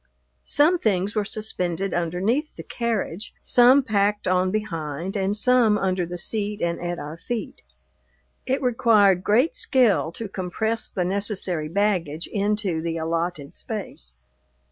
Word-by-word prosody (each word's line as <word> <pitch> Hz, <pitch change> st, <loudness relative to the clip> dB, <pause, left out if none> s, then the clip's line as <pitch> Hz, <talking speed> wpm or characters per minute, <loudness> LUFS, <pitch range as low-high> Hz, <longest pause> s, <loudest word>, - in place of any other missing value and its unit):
Some 325 Hz, +5 st, +3 dB
things 200 Hz, -, 0 dB
were 210 Hz, -, +1 dB
suspended 195 Hz, -3 st, -3 dB
underneath 185 Hz, -, 0 dB
the -, -, -8 dB
carriage, 225 Hz, -5 st, -3 dB
some 250 Hz, +3 st, +6 dB
packed 205 Hz, -3 st, 0 dB
on 185 Hz, 0 st, +2 dB
behind, 175 Hz, -4 st, -4 dB
and 200 Hz, +1 st, 0 dB
some 235 Hz, -2 st, +4 dB
under 185 Hz, -3 st, -1 dB
the 175 Hz, +1 st, -6 dB
seat 210 Hz, +3 st, -2 dB
and 170 Hz, 0 st, -2 dB
at 175 Hz, 0 st, -3 dB
our 150 Hz, +1 st, -7 dB
feet. 225 Hz, +3 st, -5 dB, 0.9 s
It 265 Hz, +1 st, 0 dB
required 215 Hz, -6 st, +4 dB
great 250 Hz, -, +2 dB
skill 260 Hz, -, +2 dB
to 225 Hz, -, -6 dB
compress 200 Hz, +4 st, -2 dB
the 180 Hz, -, -2 dB
necessary 190 Hz, -4 st, -1 dB
baggage 175 Hz, -4 st, 0 dB
into 205 Hz, -4 st, -1 dB
the 165 Hz, 0 st, -3 dB
allotted 165 Hz, -1 st, -3 dB
space. 180 Hz, -, -6 dB
200 Hz, 135 wpm, -24 LUFS, 175-220 Hz, 0.9 s, some